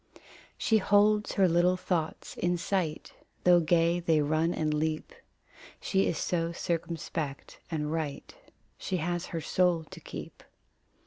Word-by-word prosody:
She 220 -1 +3
holds 210 +2 +3
her 195 -2 +4
little 175 +2 +3
thoughts 170 -4 -3
in 175 0 0
sight, 170 -3 -2 0.3
Though 175 -1 +6
gay 170 +1 +2
they 165 -2 +2
run 155 +3 +1
and 155 -3 -1
leap. 155 +1 -2 0.7
She 195 -1 +1
is 165 - -1
so 165 0 -1
circumspect 165 -4 -4
and 150 -2 -2
right; 155 -3 -4 0.5
She 185 - -2
has 175 +1 -2
her 165 - -4
soul 175 +1 +2
to - - -9
keep. - - -9
170 Hz, 135 wpm, -29 LUFS, 160-180 Hz, 0.7 s, Though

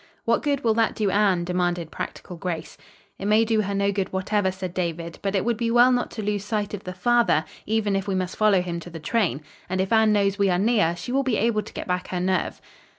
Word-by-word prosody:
"What 230 0 +2
good 285 -2 -1
will 225 -2 +3
that 225 0 +1
do 210 -3 0
Anne?" 195 -4 +2
demanded 175 -2 -1
practical 180 - -6
Grace. 170 -2 -5 0.4
"It 195 - -5
may 215 +2 +4
do 220 -1 +2
her 200 -1 -2
no 200 0 +2
good 195 -2 -2
whatever," 190 +1 0
said 185 -1 -6
David, 170 -2 -3
"but 195 0 -1
it 195 - +1
would 235 -2 +1
be 230 0 -1
well 240 +2 +6
not 245 -1 +1
to 220 - -6
lose 205 -1 -1
sight 210 -1 -2
of 205 - -6
the 185 - -5
father, 235 -5 +3 0.2
even, 215 -2 +1
if 195 0 -2
we 195 - 0
must 185 -1 -2
follow 205 -4 +3
him 170 -1 -4
to 175 - -10
the 165 -1 -8
train. 155 - 0 0.3
And 185 +1 -1
if 190 +4 0
Anne 220 -1 +5
knows 200 -1 +1
we 200 -1 +3
are 180 - +2
near, 205 -4 +2
she 210 +8 -6
will 270 +2 +2
be 255 -5 0
able 220 -1 +1
to - - -12
get - - -5
back 180 0 -1
her 180 - -3
nerve." 185 +1 -1
200 Hz, 255 wpm, -24 LUFS, 180-220 Hz, 0.4 s, well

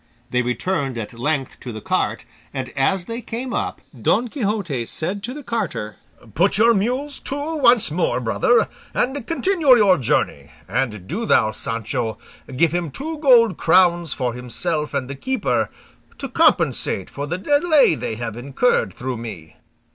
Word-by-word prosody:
They 125 - +2
returned 135 +1 -2
at 110 0 -5
length 135 +3 -2
to 125 - -7
the 110 - -6
cart, - - -1 0.3
and 130 -2 -4
as 175 +7 +1
they 230 +4 -5
came 245 +3 -5
up, - - -3 0.2
Don 245 0 +2
Quixote 200 - -2
said 185 +6 +2
to 235 +5 -2
the 295 - -8
carter, 225 - -3 0.4
"Put 190 - +2
your 230 +2 +5
mules 255 +8 -1
to 290 +4 -4
once 240 - +4
more, 170 +4 0
brother, 475 - +2 0.3
and 265 -1 -1
continue 330 -6 +4
your 195 -7 +4
journey; 125 - 0 0.2
and 105 -2 -2
do 225 +5 -3
thou, 110 - +4
Sancho, 115 0 -3 0.4
give 160 +4 +3
him 175 -1 -2
two 310 - -6
gold 245 -6 +5
crowns 175 -1 +3
for 125 -3 -2
himself 150 +6 -3
and 135 -2 -1
the 140 - -5
keeper, 260 - -1 0.5
to 275 - -5
compensate 170 - +1
for 145 +1 -5
the 175 +4 -2
delay 290 - +4
they 115 - -4
have 115 -1 -5
incurred 140 - 0
through 125 0 -4
me." 95 -9 -9
175 Hz, 160 wpm, -21 LUFS, -, 0.5 s, your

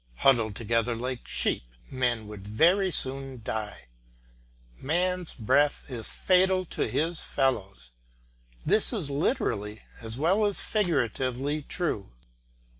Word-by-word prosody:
Huddled 115 - +3
together 115 +2 0
like 125 +1 -5
sheep, - - 0 0.3
men 120 -4 0
would 105 -2 -10
very 175 - +3
soon 135 -5 0
die. 105 - -4 0.9
Man's 180 +4 -1
breath 145 +6 +2
is 115 -3 -1
fatal 185 0 +3
to - - 0
his 165 +2 0
fellows. 95 - -1 0.7
This 215 - +5
is 170 -11 -1
literally 110 - -1 0.2
as 115 0 -5
well 185 +9 +2
as 205 -1 +1
figuratively 140 - -1
true. 150 - -3
135 Hz, 115 wpm, -27 LUFS, 115-175 Hz, 0.9 s, This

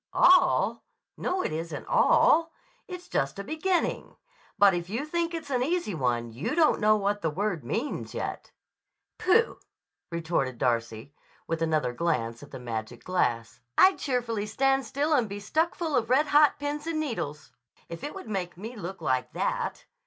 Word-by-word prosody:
"All? 365 0 +4 0.3
No; 370 0 -1
it - - -2
isn't 160 -1 -5
all. 330 +1 +4 0.4
It's 360 -1 -8
just 140 +4 -1
a 200 - -4
beginning. 325 - -1 0.4
But 200 -1 +6
if 175 0 -3
you 235 +8 -2
think 340 +2 -1
it's 315 -4 -6
an 250 -2 +1
easy 325 - 0
one 120 -6 -1
you 120 +7 -3
don't 325 -3 +4
know 215 0 +5
what 205 0 -1
the 160 - 0
word 180 - -2
means 230 - -3
yet." - - -4 0.7
"Pooh!" 445 +6 +3 0.5
retorted 160 -7 -1
Darcy 115 +1 -1 0.3
with 165 0 -3
another 155 -6 +1
glance 120 -7 -1
at 145 - -12
the - - -8
magic 115 -1 -5
glass. 120 -11 -1 0.2
"I'd 380 0 +6
cheerfully 235 -6 -1
stand 270 +3 +1
still 295 +5 0
and 245 -7 +2
be 200 +1 -5
stuck 315 +11 0
full 320 -4 -2
of 235 -2 +1
red 270 +4 +4
hot 295 0 +5
pins 290 +2 -4
and 325 -2 -1
needles, 155 - -4 0.4
if 170 -1 -8
it 295 - -5
would 385 - -8
make 185 -5 -3
me 225 +6 -7
look 190 -3 -7
like 130 -3 0
that. - - -2
205 Hz, 170 wpm, -27 LUFS, -, 0.7 s, But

